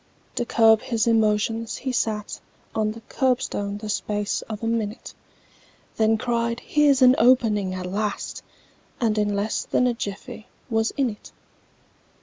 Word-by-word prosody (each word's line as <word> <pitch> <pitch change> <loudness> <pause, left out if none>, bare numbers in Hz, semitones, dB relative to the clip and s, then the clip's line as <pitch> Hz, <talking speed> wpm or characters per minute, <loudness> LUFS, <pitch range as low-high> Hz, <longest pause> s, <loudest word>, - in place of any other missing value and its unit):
To 240 - -2
curb 225 -1 +5
his 230 -3 -1
emotions, 225 0 +1
he 260 - -3
sat 215 -4 -2 0.3
On 215 -1 0
the 225 +1 -10
curbstone 245 -6 -1
the 215 +1 -7
space 210 0 -2
of 215 0 -6
a - - 0
minute, 225 0 -3 0.8
Then 220 0 +3
cried, 235 0 -1
"Here's 285 -2 +3
an 250 0 +8
opening 220 -6 +3
at 185 -1 -5
last!" 205 +3 -3 0.6
And 225 -3 +1
in 205 -1 0
less 205 +2 -1
than 250 - +1
a 250 - +2
jiffy 220 +1 -7 0.2
was 225 0 +2
in 265 -4 +1
it! 210 - -13
225 Hz, 145 wpm, -24 LUFS, 210-235 Hz, 0.8 s, an